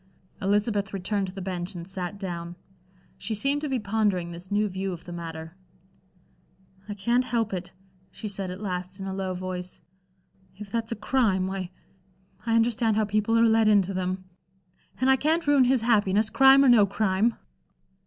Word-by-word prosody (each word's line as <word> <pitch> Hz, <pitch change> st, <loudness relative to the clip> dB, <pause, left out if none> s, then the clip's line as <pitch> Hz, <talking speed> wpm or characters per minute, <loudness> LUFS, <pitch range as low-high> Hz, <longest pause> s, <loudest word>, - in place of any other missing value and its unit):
Elizabeth 205 Hz, 0 st, 0 dB
returned 195 Hz, +1 st, -1 dB
to -, -, -6 dB
the 195 Hz, -, -6 dB
bench 180 Hz, 0 st, -4 dB
and 170 Hz, 0 st, -7 dB
sat 190 Hz, 0 st, -5 dB
down. 175 Hz, -3 st, -5 dB, 0.6 s
She 220 Hz, -, -3 dB
seemed 275 Hz, +7 st, +1 dB
to 300 Hz, -, -3 dB
be 265 Hz, -, 0 dB
pondering 205 Hz, -5 st, 0 dB
this 175 Hz, +2 st, -9 dB
new 210 Hz, +1 st, +2 dB
view 190 Hz, 0 st, -3 dB
of 170 Hz, -, -10 dB
the 175 Hz, -, -8 dB
matter. 165 Hz, -1 st, -7 dB, 1.3 s
"I 205 Hz, -, -4 dB
can't 235 Hz, +5 st, +1 dB
help 230 Hz, -5 st, -1 dB
it," 180 Hz, -1 st, -5 dB, 0.4 s
she 215 Hz, -, -7 dB
said 195 Hz, -2 st, -4 dB
at 180 Hz, +1 st, -6 dB
last, 185 Hz, -1 st, -5 dB
in 190 Hz, -, -5 dB
a 190 Hz, -, -4 dB
low 190 Hz, -1 st, -3 dB
voice. 180 Hz, 0 st, -6 dB, 0.8 s
"If 200 Hz, 0 st, -10 dB
that's 230 Hz, 0 st, -2 dB
a -, -, -1 dB
crime, 210 Hz, -5 st, +1 dB
why 190 Hz, -1 st, -4 dB, 0.8 s
I 225 Hz, -, +2 dB
understand 230 Hz, -1 st, +2 dB
how 215 Hz, -, +2 dB
people 215 Hz, +2 st, +1 dB
are 230 Hz, -, +5 dB
led 225 Hz, -1 st, +4 dB
into 200 Hz, -2 st, +3 dB
them. 185 Hz, 0 st, -2 dB, 0.8 s
And 255 Hz, -, +2 dB
I 265 Hz, 0 st, +5 dB
can't 320 Hz, +5 st, +1 dB
ruin 285 Hz, -3 st, +5 dB
his 255 Hz, -1 st, +3 dB
happiness, 215 Hz, -2 st, +2 dB
crime 270 Hz, 0 st, +7 dB
or -, -, +6 dB
no 220 Hz, -4 st, +6 dB
crime." 205 Hz, +2 st, +1 dB
200 Hz, 180 wpm, -26 LUFS, 185-225 Hz, 1.3 s, crime